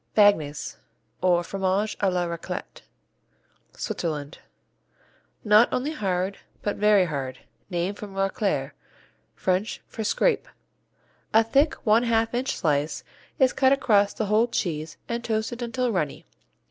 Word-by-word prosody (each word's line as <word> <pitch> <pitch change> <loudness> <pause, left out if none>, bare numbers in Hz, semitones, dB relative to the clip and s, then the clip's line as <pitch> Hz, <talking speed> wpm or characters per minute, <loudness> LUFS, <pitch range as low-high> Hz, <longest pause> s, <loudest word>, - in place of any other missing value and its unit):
Bagnes, 155 -9 +3 0.4
or 175 -1 +3
Fromage 195 +3 -1
à 195 -2 +2
la 180 -1 0
Raclette 170 -1 -6 0.9
Switzerland 150 -2 -4 1.0
Not 210 +2 +5
only 270 +5 -1
hard 190 - -2 0.2
but 205 - -1
very 210 -2 +5
hard, 135 -5 -4 0.3
named 180 +2 -2
from 200 -2 -8
racler, 195 -7 0 0.6
French 190 +3 -1
for 220 - -5
"scrape." 470 - +1 0.9
A 225 - +7
thick, 275 +7 +2
one 220 +1 +5
half 230 -1 +1
inch 250 +2 -1
slice 150 -2 0 0.3
is 260 -4 +4
cut 265 0 +4
across 205 -7 +3
the 220 - -1
whole 215 +3 +3
cheese 165 -8 -3
and 235 0 -3
toasted 225 +2 -2
until 245 +1 -1
runny. 155 -8 -2
205 Hz, 125 wpm, -25 LUFS, 175-230 Hz, 1.0 s, A